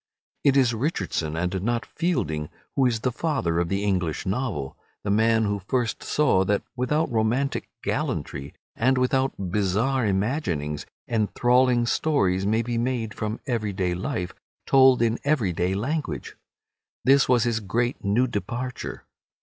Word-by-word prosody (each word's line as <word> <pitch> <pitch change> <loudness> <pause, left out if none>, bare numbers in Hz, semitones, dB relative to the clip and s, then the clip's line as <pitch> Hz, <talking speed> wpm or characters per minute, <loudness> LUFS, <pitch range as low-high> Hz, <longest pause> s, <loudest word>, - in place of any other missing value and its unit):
It 140 -1 +4
is 125 -3 +4
Richardson 100 - -2
and 90 +2 -1
not 120 +3 -1
Fielding 115 - -1 0.3
who 135 -2 +4
is 115 -3 -1
the 125 - 0
father 125 - 0
of 85 -1 0
the 100 +2 -1
English 90 -6 -1
novel, 95 - -2 0.3
the 100 - -1
man 110 +2 +3
who 100 -1 -1
first 120 -4 0
saw 150 -11 +2
that 100 +1 +1
without 140 +4 0
romantic 120 +5 0
gallantry, 70 +1 -3 0.2
and 130 +3 +2
without 125 -7 0
bizarre 105 +6 +1
imaginings, 95 - -1 0.2
enthralling 120 +2 +2
stories 100 -10 +1
may 110 +2 +2
be 120 0 -2
made 120 -3 -1
from 110 +1 -4
everyday 105 -7 -1
life, 90 0 -3 0.3
told 130 -3 +6
in 115 0 +1
everyday 95 - +1
language. 145 +9 -3 0.7
This 135 0 +5
was 125 -2 +4
his 120 -2 0
great 120 +4 -1
new 105 +5 +2
departure. 120 +3 -4
115 Hz, 140 wpm, -25 LUFS, 95-130 Hz, 0.7 s, told